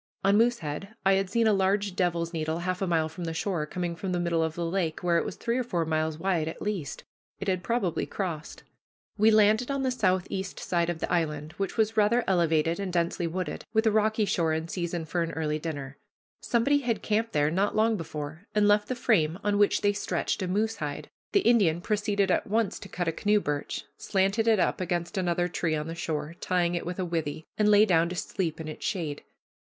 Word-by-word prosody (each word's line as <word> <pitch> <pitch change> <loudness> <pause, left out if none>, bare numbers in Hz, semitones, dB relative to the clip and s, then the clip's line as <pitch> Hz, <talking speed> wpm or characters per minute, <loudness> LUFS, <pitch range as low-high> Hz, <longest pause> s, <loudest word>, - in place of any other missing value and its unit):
On 200 +1 +4
Moosehead 210 -4 0
I 195 - +6
had 195 -1 +1
seen 230 +3 +2
a 215 - +5
large 195 0 +1
devil's 170 -2 0
needle 160 0 -1
half 180 +2 -2
a 195 - 0
mile 165 -2 +2
from 170 +2 -7
the 165 -1 -3
shore, 165 -4 -1
coming 175 +1 -3
from 185 +2 -3
the 175 - 0
middle 170 -1 +1
of 160 0 -1
the 170 - -2
lake, 165 -2 -1
where 170 -1 +3
it - - -1
was 205 - -5
three 235 +2 -1
or - - 0
four 175 -8 -1
miles 155 0 -1
wide 165 -2 0
at 160 - -5
least. 195 -9 -4 0.4
It - - -5
had 185 -2 +1
probably 200 -5 -1
crossed. 170 -6 -5 0.6
We 215 +1 +6
landed 215 +3 +4
on 275 -1 -1
the 260 - +1
southeast 190 -4 -1
side 170 -1 0
of 165 -2 -3
the - - -1
island, 150 -3 -1
which 195 +3 -3
was 220 0 +1
rather 225 +3 +4
elevated, 165 -2 +2
and 195 -2 -3
densely 170 0 0
wooded, 175 -1 -4
with 220 0 +3
a 220 - +4
rocky 215 0 +2
shore, 165 -5 +1
in 160 +1 -3
season 170 -2 -3
for 170 +3 -1
an 165 0 -2
early 155 -1 -1
dinner. 145 -4 -5 0.4
Somebody 275 +4 +2
had 240 -5 -2
camped 225 +2 0
there 150 0 +2
not 195 +4 +1
long 220 +1 +3
before 155 0 -6
and 210 -1 +4
left 210 0 +4
the 255 - -2
frame 175 -10 +2
on 205 -1 +1
which 205 - +3
they 205 0 +3
stretched 205 - -2
a 185 - -1
moose 220 +4 0
hide. 145 -1 -5 0.2
The 400 - +4
Indian 200 - +4
proceeded 205 0 0
at - - +1
once 220 0 0
to 195 - -10
cut 175 -1 -3
a - - +2
canoe 210 +5 +2
birch, 145 -6 -3
slanted 195 +3 +1
it 225 -1 +5
up 185 - +1
against 175 -1 -2
another 175 -2 +1
tree 165 -2 -1
on 150 0 -2
the 165 - -5
shore, 160 -2 -3
tying 175 -1 +1
it 170 -1 -3
with 180 - -4
a 185 - -1
withe, 160 -2 -3
and 210 -1 +3
lay 210 0 +7
down 170 -4 +3
to 180 - -5
sleep 175 -3 -3
in 160 - -6
its 155 - -7
shade. 165 -8 -2
180 Hz, 225 wpm, -28 LUFS, 165-210 Hz, 0.6 s, lay